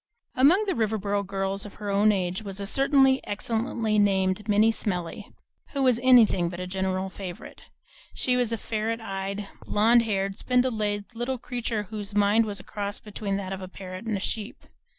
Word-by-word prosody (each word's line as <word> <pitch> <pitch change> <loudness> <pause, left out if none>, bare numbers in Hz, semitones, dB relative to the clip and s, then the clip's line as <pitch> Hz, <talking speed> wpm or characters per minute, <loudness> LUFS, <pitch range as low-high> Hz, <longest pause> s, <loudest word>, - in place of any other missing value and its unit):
Among 325 +11 +5
the 385 - 0
Riverboro 210 - 0
girls 195 0 -2
of 205 - -9
her 205 -1 -4
own 205 +2 +4
age 185 -1 -1
was 200 -2 -5
a 200 - -3
certain 270 +3 +4
excellently 220 +1 -1
named 195 +1 +1
Minnie 215 +2 +5
Smellie, 185 -2 -4 0.4
who 275 -1 0
was 250 -3 +3
anything 230 -9 +5
but 175 0 -7
a 180 - -3
general 190 0 -2
favorite. 185 -3 -9 0.5
She 250 - +1
was 245 -2 +1
a 230 - 0
ferret 225 +1 -2
eyed, 200 -1 -4 0.2
blond 230 +3 +4
haired, 195 -3 -2
spindle 250 0 +2
legged 205 0 -2
little 240 +3 -2
creature 235 -3 -3
whose 205 0 -5
mind 205 +2 +4
was 200 -2 -4
a - - -11
cross 205 -1 -4
between 205 -2 -4
that 195 -1 -4
of 190 - -6
a 185 - -6
parrot 185 +2 -8
and 220 -3 -1
a - - -4
sheep. 210 +2 -5
210 Hz, 185 wpm, -26 LUFS, 195-230 Hz, 0.5 s, Among